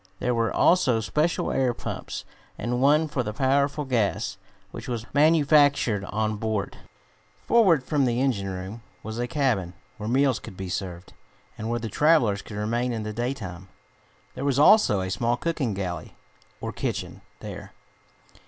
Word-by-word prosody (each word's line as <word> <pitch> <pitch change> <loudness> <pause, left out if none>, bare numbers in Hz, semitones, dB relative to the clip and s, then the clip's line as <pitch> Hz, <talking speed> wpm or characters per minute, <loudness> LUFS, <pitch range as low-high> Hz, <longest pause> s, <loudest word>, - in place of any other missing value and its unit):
There 125 +4 0
were 115 -1 +1
also 145 -10 +3
special 150 +9 0
air 130 -3 +1
pumps, - - -6 0.3
and 125 +1 -2
one 150 +3 +4
for 145 -3 -2
the 105 -3 -4
powerful 140 +4 +1
gas, 105 -5 -1 0.3
which - - -8
was 120 -3 -3
manufactured 145 -7 +4
on 110 +1 -1
board. 110 -2 -2 0.7
Forward 185 - +4
from 145 -2 +1
the 120 -1 0
engine 115 -8 0
room 95 +5 -6 0.2
was 110 +2 -5
a 120 - -1
cabin, 115 - 0 0.2
where 105 0 -4
meals 135 0 +2
could 95 - -11
be 95 -1 -5
served, 90 -2 -5 0.4
and 110 +1 -5
where 120 - 0
the 115 - -4
travelers 120 -5 +3
could 105 - -9
remain 120 +4 -1
in 110 -2 -3
the 105 0 -4
daytime. 105 -7 -4 0.7
There - - -6
was 140 -2 +1
also 150 - +5
a 95 0 -3
small 115 +5 0
cooking 140 -10 -2
galley, 90 -4 -5 0.5
or - - -3
kitchen, - - -4 0.2
there. - - -8
120 Hz, 160 wpm, -25 LUFS, 105-140 Hz, 0.7 s, also